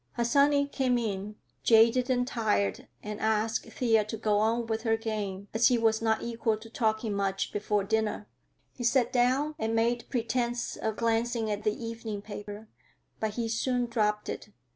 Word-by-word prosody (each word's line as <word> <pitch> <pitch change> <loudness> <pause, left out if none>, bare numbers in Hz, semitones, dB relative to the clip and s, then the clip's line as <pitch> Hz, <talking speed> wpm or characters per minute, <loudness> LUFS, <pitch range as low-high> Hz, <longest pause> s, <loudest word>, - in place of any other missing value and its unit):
Harsanyi 280 +4 +3
came 255 -3 +1
in, 210 -2 -3 0.3
jaded 230 +3 +5
and 245 -1 +2
tired, 215 -5 0 0.2
and 210 0 -5
asked 220 +1 0
Thea 225 -4 +2
to 215 +1 -5
go 210 -1 +1
on 230 +2 +1
with 220 0 -2
her 225 -1 +1
game, 205 -3 -4
as 225 +2 +5
he 250 - +3
was 225 -1 +2
not 220 -1 +1
equal 230 -2 -1
to 225 +1 -13
talking 220 -2 0
much 195 -1 -1
before 205 0 0
dinner. 215 0 -1 0.5
He 245 - -7
sat 245 +1 +2
down 260 +5 +2
and 225 -2 -1
made 235 +1 0
pretense 240 0 -1
of 220 -1 -2
glancing 230 0 0
at 205 0 -3
the 215 +2 -1
evening 225 -3 -5
paper, 205 0 -8 0.5
but 215 -1 -2
he 235 -1 -1
soon 245 +2 0
dropped 210 -3 0
it. - - -5
225 Hz, 170 wpm, -29 LUFS, 215-240 Hz, 0.5 s, jaded